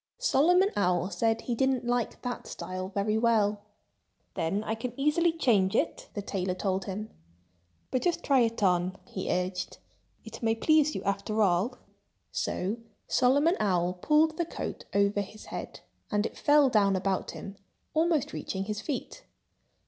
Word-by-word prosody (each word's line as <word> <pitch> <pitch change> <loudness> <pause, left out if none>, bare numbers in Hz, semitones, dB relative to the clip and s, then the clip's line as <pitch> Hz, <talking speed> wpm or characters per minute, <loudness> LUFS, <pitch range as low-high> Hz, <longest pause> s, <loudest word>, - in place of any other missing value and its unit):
Solomon 360 - +4
Owl 180 -1 +1
said 225 +5 +1
he 245 - -2
didn't 265 0 +1
like 240 -1 -1
that 245 -1 -4
style 185 0 -5
very 210 +2 0
well. 215 -3 +2 0.7
"Then 185 +6 -1
I 220 - -2
can 240 +3 -5
easily 305 +4 +3
change 220 -12 +2
it," - - -1
the 205 - -3
tailor 185 -2 -2
told 190 0 -1
him. 210 +3 -5 0.8
"But 255 - +1
just 350 -2 0
try 275 -2 +4
it 230 -2 +1
on!" 180 0 +2
he 190 0 -5
urged. 180 0 -2 0.5
"It 225 0 -9
may 225 -1 +2
please 305 +4 +3
you, - - -4
after 200 +2 0
all." 195 +7 +1 0.5
So 195 +5 -2 0.3
Solomon 285 +7 +3
Owl 180 -3 +1
pulled 305 - +2
the 340 - 0
coat 335 - -6
over 200 0 +2
his 210 +2 -10
head. - - -7 0.3
And 210 0 +1
it - - -4
fell 290 -1 +5
down 200 -3 +4
about 190 0 -1
him, 195 0 -8 0.4
almost 320 -2 +1
reaching 190 0 -3
his 210 +1 -4
feet. 300 - -5
215 Hz, 155 wpm, -29 LUFS, 195-265 Hz, 0.8 s, fell